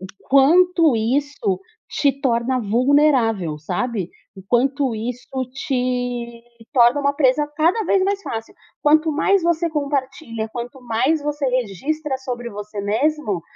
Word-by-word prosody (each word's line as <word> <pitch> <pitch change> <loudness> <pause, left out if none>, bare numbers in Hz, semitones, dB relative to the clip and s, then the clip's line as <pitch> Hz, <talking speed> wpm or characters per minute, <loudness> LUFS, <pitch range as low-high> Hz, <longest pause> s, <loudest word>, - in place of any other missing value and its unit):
O 190 - -7 0.2
quanto 325 +3 +5
isso 230 -4 -1 0.3
te 280 -2 +1
torna 255 -1 +1
vulnerável, 235 - +2
sabe, 185 +4 -3 0.3
o 190 - -10
quanto 265 +2 +1
isso 235 +3 -5 0.2
te 245 -3 -2 0.3
torna 250 +1 +4
uma 280 0 +1
presa 285 +1 +2
cada 350 +8 +2
vez 390 -1 +2
mais 400 0 0
fácil. 225 - -6 0.3
Quanto 310 +2 +4
mais 380 +5 +2
você 340 0 +1
compartilha, 275 -5 -3
quanto 245 +2 -7
mais 260 +7 0
você 295 -1 -2
registra 260 - -2
sobre 245 -2 -5
você 210 +1 -8
mesmo, 220 - 0
260 Hz, 130 wpm, -21 LUFS, 235-295 Hz, 0.3 s, quanto